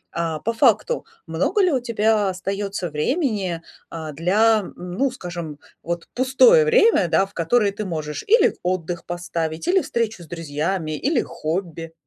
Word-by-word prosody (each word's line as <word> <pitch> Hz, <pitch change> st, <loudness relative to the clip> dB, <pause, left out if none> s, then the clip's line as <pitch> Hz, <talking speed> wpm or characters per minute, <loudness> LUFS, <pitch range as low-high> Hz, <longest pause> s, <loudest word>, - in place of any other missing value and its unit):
э, 165 Hz, -2 st, -1 dB
по 230 Hz, -, 0 dB
факту, 480 Hz, -, +2 dB, 0.2 s
много 415 Hz, -, +1 dB
ли 365 Hz, -3 st, +3 dB
у 265 Hz, -, +2 dB
тебя 220 Hz, -3 st, +1 dB
остаётся 195 Hz, 0 st, -3 dB
времени, 190 Hz, -, -1 dB, 0.3 s
э, 160 Hz, -2 st, -6 dB
для, 210 Hz, +8 st, +3 dB
ну, 185 Hz, +10 st, -2 dB
скажем, 170 Hz, -, -7 dB, 0.2 s
вот 170 Hz, 0 st, -4 dB
пустое 460 Hz, -, +5 dB
время, 460 Hz, -, +4 dB
да, 190 Hz, -, +3 dB
в 195 Hz, -, -18 dB
которое 200 Hz, +5 st, +2 dB
ты 210 Hz, +1 st, -5 dB
можешь 155 Hz, -4 st, -4 dB
или 460 Hz, +4 st, +4 dB
отдых 175 Hz, -1 st, -2 dB
поставить, 170 Hz, -, -4 dB
или 375 Hz, 0 st, +4 dB
встречу 220 Hz, -6 st, -2 dB
с 160 Hz, -, -14 dB
друзьями, 160 Hz, +1 st, -3 dB
или 275 Hz, -, +1 dB
хобби? 165 Hz, 0 st, -4 dB
190 Hz, 150 wpm, -22 LUFS, 165-235 Hz, 0.3 s, пустое